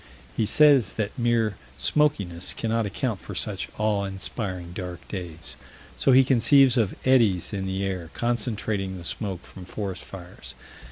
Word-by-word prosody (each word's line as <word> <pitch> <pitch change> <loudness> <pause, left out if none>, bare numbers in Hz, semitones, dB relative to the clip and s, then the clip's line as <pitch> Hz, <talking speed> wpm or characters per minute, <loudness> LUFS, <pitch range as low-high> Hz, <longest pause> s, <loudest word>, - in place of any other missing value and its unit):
He 110 - +1
says 140 -8 +5
that 110 -2 -3
mere 115 -4 +1 0.2
smokiness 95 - 0
cannot 115 -1 0
account 105 +1 -2
for - - -8
such - - -2
"awe 105 -2 +1
inspiring 95 -2 -5
dark 90 -2 -7
days." 85 -4 -6 0.4
So - - +3
he 130 +1 +8
conceives 130 +1 +5
of 110 -6 +1
eddies 115 -9 +3
in 95 -1 -2
the 95 +1 -2
air, 90 -4 -3
concentrating 110 -5 -1
the 85 - -9
smoke 95 +1 -4
from 95 - -11
forest 95 0 -5
fires. 90 -1 -10
100 Hz, 150 wpm, -25 LUFS, 95-120 Hz, 0.4 s, he